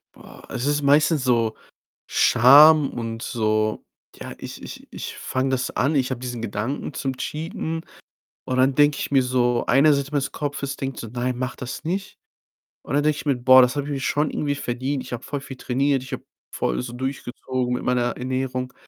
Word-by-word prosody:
Boah, - - -14
es 125 - -3
ist 145 +1 +1
meistens 145 +1 +3
so 115 -3 +1 0.5
Scham 145 +5 +6
und 115 -1 -5
so, 110 -3 0 0.3
ja, - - -8
ich - - -9
ich - - -10
ich - - -6
fange 130 +1 -2
das 130 0 -1
an, 140 +5 0
ich 135 -2 +1
habe 130 -2 -3
diesen 120 -2 -5
Gedanken 115 +7 -3
zum 135 -1 -3
Cheaten 160 - -4 0.7
und 130 - -1
dann 130 +1 +4
denke 145 0 +4
ich - - -4
mir 135 -1 +5
so 125 -1 +1
eine 140 +5 +5
Seite 140 0 -2
meines 145 -2 -1
Kopfes 145 -1 -4
denkt 135 -2 -4
so: 115 - -6
„Nein, 125 +1 -2
mach 125 0 -3
das 125 +3 -7
nicht.“, 190 +4 -4 0.7
und - - -6
dann 145 - +2
denke 155 0 +2
ich - - -7
mir: 140 -2 +2
„Boah, 130 +1 +7
das 125 +1 +2
habe 145 -1 -2
ich - - -4
mir 140 - -2
schon 150 +3 0
irgendwie 145 -1 -1
verdient. 130 +1 -3
Ich - - -8
habe 120 - -5
voll 145 - -4
viel 135 -2 -9
trainiert. 135 +1 0
Ich 130 - -11
habe 130 - -5 0.3
voll - - -1
so 120 -1 -7
durchgezogen 130 -1 -3
mit 125 - -3
meiner 120 -1 0
Ernährung.“ 130 0 -3
130 Hz, 200 wpm, -23 LUFS, 125-145 Hz, 0.7 s, Boah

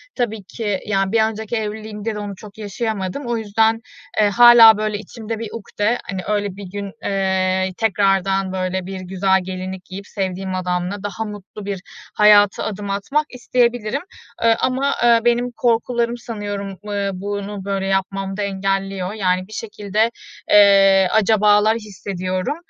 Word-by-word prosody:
tabii 220 -4 -2
ki, 205 0 -3
yani, 195 -1 0
bir 225 - +3
önceki 220 +1 -3
evliliğimde 215 0 -4
de - - -4
onu 205 -1 -5
çok 205 +2 -13
yaşayamadım. 215 +2 -4
O 235 -1 0
yüzden, 225 +1 +1 0.4
eee, 210 -1 +4
hâlâ, 230 0 +8
böyle 215 -1 -1
içimde 220 +2 -7
bir 225 -2 -5
ukte, 220 +1 -1
hani, 190 -2 -3
öyle 205 -2 -2
bir 195 -2 -9
gün, 200 0 -5
eee, 190 -1 0
tekrardan, 195 -2 +1
böyle, 185 0 -2
bir 190 0 -6
güzel 190 +1 +1
gelinlik 185 0 -6
giyip 195 +2 -9
sevdiğim 190 -1 -3
adamla 180 +2 -2
daha 205 +2 -4
mutlu 210 0 -9
bir 200 -2 -4 0.3
hayata 205 -1 +5
adım 205 -1 -4
atmak 275 +10 0
isteyebilirim. 245 0 0 0.4
E, 230 - +5
ama, 265 +4 0
ııı, 235 -1 +4
benim, 240 0 +3
ııı, 245 - -6
korkularım 235 0 +1
sanıyorum 205 -4 -5 0.4
bunu 200 -1 -5
böyle 195 -1 -2
yapmamda 195 +1 -2
engelliyor. 195 -1 -2
Yani, 185 -3 0
bir 215 - -13
şekilde, 215 +1 -1 0.4
eee, 195 -2 +6
acabalar 210 0 +4
hissediyorum. 185 - -4
205 Hz, 145 wpm, -20 LUFS, 195-220 Hz, 0.4 s, hâlâ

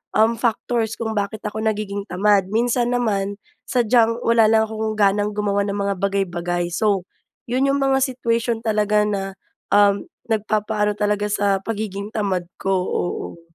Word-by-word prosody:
um, 225 +2 +3
factors 230 -1 0
kung 220 -1 -3
bakit 210 0 -3
ako 215 +1 -4
nagiging 210 -2 -2
tamad. 195 +1 +2
Minsan 240 +3 +1
naman, 205 -4 0 0.3
sadyang, 235 -2 +3
wala 230 -2 +4
lang 220 0 +4
akong 220 0 -3
ganang 205 0 +2
gumawa 200 -1 +1
ng 200 - -2
mga 200 -1 -1
bagay-bagay, 175 -3 -1
so, 200 -2 +1 0.5
'yun 260 +3 +2
'yung 280 +1 +2
mga 270 0 +3
situation 235 -3 -1
talaga 210 -1 +2
na, 200 -2 -1 0.5
um, 205 -1 +4 0.2
nagpapa-ano 210 -1 0
talaga 210 0 0
sa, 200 -1 +1
pagiging 205 -1 -4
tamad 190 -5 -1
ko, 195 - -1
oo. 175 -2 -3
210 Hz, 145 wpm, -21 LUFS, 200-225 Hz, 0.5 s, wala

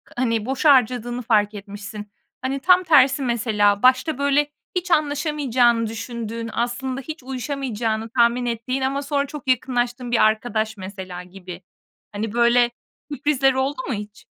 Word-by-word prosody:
hani, 230 -3 0
boşa 275 +3 +4
harcadığını 245 -1 +1
fark 215 -2 +2
etmişsin. 205 0 -9 0.3
Hani, 265 +2 -2
tam 365 +5 +5
tersi 275 -4 +5
mesela, 210 -4 +1
başta 255 +4 +3
böyle 285 +1 +2 0.3
hiç 360 0 -2
anlaşamayacağını 280 -6 +2
düşündüğün, 230 0 -5
aslında 255 +3 -2
hiç 310 0 -8
uyuşamayacağını 245 -4 -3
tahmin 240 +1 +2
ettiğin 240 +3 -2
ama 270 +2 -1
sonra 285 0 -1
çok 290 -2 -9
yakınlaştığın 245 -1 0
bir 235 - +4
arkadaş, 220 -1 0
mesela, 185 -2 -7
gibi. 180 -1 -10 0.5
Hani, 205 +1 -4
böyle 240 0 +4 0.4
sürprizler 275 -2 +2
oldu 270 +5 -1
mu 265 - -1
hiç? 210 0 -8
245 Hz, 140 wpm, -22 LUFS, 220-270 Hz, 0.5 s, tam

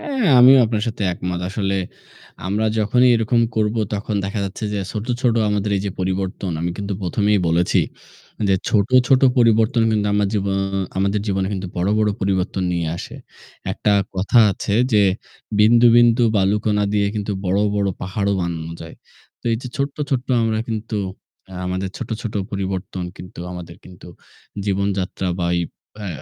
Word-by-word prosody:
হ্যাঁ, 270 -6 -1
আমিও 130 +2 +8
আপনার 110 -1 -1
সাথে 110 -2 -3
একমত। 90 0 -4
আসলে 100 -1 -1 0.7
আমরা 105 +3 0
যখনই 125 +4 +3
এরকম 115 +1 +1 0.2
করব 105 0 +1 0.2
তখন 105 +1 -3
দেখা 100 +3 -3
যাচ্ছে 100 +3 -5
যে 105 - -1
ছোট, 105 0 -4
ছোট 120 -3 +2 0.2
আমাদের 105 0 -1
এই - - -1
যে - - -1
পরিবর্তন 95 0 -2
আমি 85 +1 -1
কিন্তু 100 0 -4
প্রথমেই 105 +3 +1
বলেছি 85 +2 +2 0.7
যে 95 - +4
ছোট, 100 -2 +2 0.2
ছোট 130 0 +4 0.2
পরিবর্তন 115 0 +3
কিন্তু 105 -1 +1
আমার 105 0 +2
জীবও 100 -2 0 0.4
আমাদের 100 +2 +1
জীবনে 95 -2 0
কিন্তু 95 -2 -4
বড়, 90 +2 0
বড় 105 -1 +2
পরিবর্তন 95 -1 -1
নিয়ে 85 -2 -1
আসে। - - -8 0.6
একটা 105 - 0 0.2
কথা 95 +6 +2
আছে 100 +2 -3 0.2
যে 105 -1 +5 0.6
"বিন্দু, 115 +3 +6
বিন্দু 120 0 +5
বালুকণা 105 +1 +1
দিয়ে 100 -1 +2
কিন্তু 105 -1 -2
বড়, 95 +1 +1 0.2
বড় 100 -1 +1
পাহাড়ও 100 +2 -1
বানানো 85 -2 -4
যায়"। 80 0 -10 0.4
তো - - -38
এই - - +1
যে 130 - -6
ছোট্ট, 140 0 -2
ছোট্ট 130 -2 -1 0.2
আমরা 110 -1 0
কিন্তু 110 0 -3 0.6
আ - - -7
আমাদের 95 +1 -2
ছোট, - - -6
ছোট 115 - -5 0.2
পরিবর্তন 95 -1 -4
কিন্তু 90 -1 -10
আমাদের 85 -1 -9
কিন্তু 90 -1 -13 0.6
জীবনযাত্রা 100 -2 -1
বা 85 - 0
ওই 85 - +1 0.4
অ্যা 105 -2 -5
100 Hz, 165 wpm, -20 LUFS, 95-110 Hz, 0.7 s, আমিও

